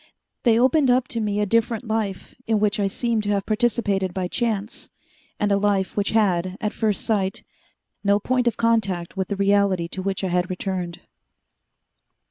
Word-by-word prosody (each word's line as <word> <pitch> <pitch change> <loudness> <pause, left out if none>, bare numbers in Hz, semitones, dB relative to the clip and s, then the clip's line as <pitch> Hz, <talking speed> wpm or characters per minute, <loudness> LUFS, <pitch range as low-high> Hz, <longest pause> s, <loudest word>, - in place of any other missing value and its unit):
They 230 -2 +4
opened 265 +2 +4
up 250 0 +3
to 240 -5 -2
me 210 -1 -1
a 210 - +2
different 230 +3 +1
life 215 -4 -3
in 220 -1 +2
which 210 +1 +1
I 200 - +2
seemed 230 +2 -1
to - - -1
have 200 -1 -1
participated 210 -5 0
by 185 -1 -1
chance, 220 -2 -2 0.5
and 205 -1 +1
a 200 - +4
life 200 -2 0
which 205 -1 0
had, 185 -4 +1
at 210 - -2
first 215 -3 0
sight, 195 -4 0 0.6
no 200 0 +4
point 250 +3 0
of 235 - +1
contact 200 -7 0
with 190 -1 -2
the 200 - -2
reality 200 -3 +2
to 190 - -4
which 195 0 -2
I 190 - 0
had 180 +1 0
returned.... 180 -2 -4
205 Hz, 180 wpm, -23 LUFS, 190-225 Hz, 0.6 s, They